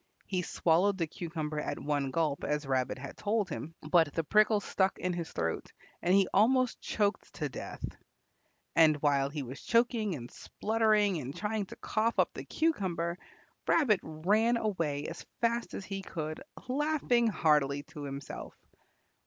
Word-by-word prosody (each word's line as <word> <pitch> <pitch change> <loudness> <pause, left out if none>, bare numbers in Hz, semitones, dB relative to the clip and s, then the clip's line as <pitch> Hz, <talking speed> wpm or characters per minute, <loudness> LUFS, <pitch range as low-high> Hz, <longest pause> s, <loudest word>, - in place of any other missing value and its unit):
He 185 -2 -1
swallowed 180 +3 +2
the 170 - +1
cucumber 155 -2 -4
at - - -3
one 145 -2 -1
gulp, 155 -1 0
as 150 0 -1
Rabbit 130 -1 0
had 140 +2 -8
told 205 -3 0
him, 160 +2 -5
but 160 -2 +4
the 165 - +1
prickles 210 +4 +3
stuck 190 0 +1
in 180 0 -1
his 170 -2 -4
throat 80 -1 -2 0.3
and 180 +2 +3
he 195 -2 +5
almost 250 +4 +3
choked 205 -1 -1
to - - -2
death. - - -6 0.9
And 155 -2 +6
while 140 -2 +3
he 145 -1 -4
was 130 +2 -8
choking 230 -5 +2
and 120 -3 -8
spluttering 215 -3 +1
and 135 0 -6
trying 210 -1 -2
to - - -9
cough 225 +2 0
up - - +3
the - - -7
cucumber, 185 - 0 0.5
Rabbit 235 - +4
ran 210 +10 +2
away 165 -10 -1
as - - -6 0.2
fast 235 0 0
as 195 - -5
he 195 0 -4
could, 155 -4 -5 0.3
laughing 265 -3 +2
heartily 150 -7 +2
to 160 -1 -10
himself. 140 0 -7
180 Hz, 160 wpm, -31 LUFS, 150-215 Hz, 0.9 s, And